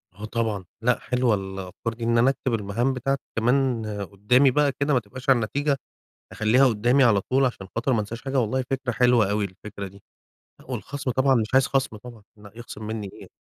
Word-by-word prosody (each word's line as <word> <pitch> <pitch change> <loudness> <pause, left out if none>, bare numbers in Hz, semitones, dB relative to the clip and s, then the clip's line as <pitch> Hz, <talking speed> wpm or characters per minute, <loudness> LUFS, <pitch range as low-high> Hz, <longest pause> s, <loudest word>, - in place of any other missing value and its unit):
آه 105 +2 -7
طبعًا. 110 -4 -2 0.2
لأ 125 +2 +2
حلوة 125 -3 +1
الأفكار 95 +3 -5
دي، 115 - -8
إن 115 0 +2
أنا 125 +3 +5
أكتب 130 -2 -2
المهام 115 +5 0
بتاعتي 135 +2 -1
كمان 120 0 +1 0.3
قُدّامي 125 +7 +4
بقى 145 +1 +2
كده، 140 +1 +1
ما 125 - +4
تبقاش 130 +5 -8
على 130 - +6
النتيجة، 140 +5 0 0.5
أخلّيها 115 +5 +3
قُدّامي 120 +4 +3
على 105 -5 +4
طول 135 +6 +1
عشان 100 -6 -3
خاطر 125 +3 +1
ما 110 - +2
انساش 110 +3 -5
حاجة. 135 0 0
والله 130 +3 0
فكرة 135 -2 -1
حلوة 120 -4 +3
أوي 105 0 0
الفكرة 100 +1 -8
دي. 100 +1 -16 0.7
والخَصم 140 -2 -4
طبعًا 130 +2 +3
مش 110 -3 +1
عايز 135 -1 +5
خَصم 135 -5 -1
طبعًا، 115 0 -12
لأ 105 -1 -14
يخصِم 115 -2 -9
منّي 110 -3 -4
إيه. - - -13
120 Hz, 195 wpm, -24 LUFS, 105-130 Hz, 0.7 s, على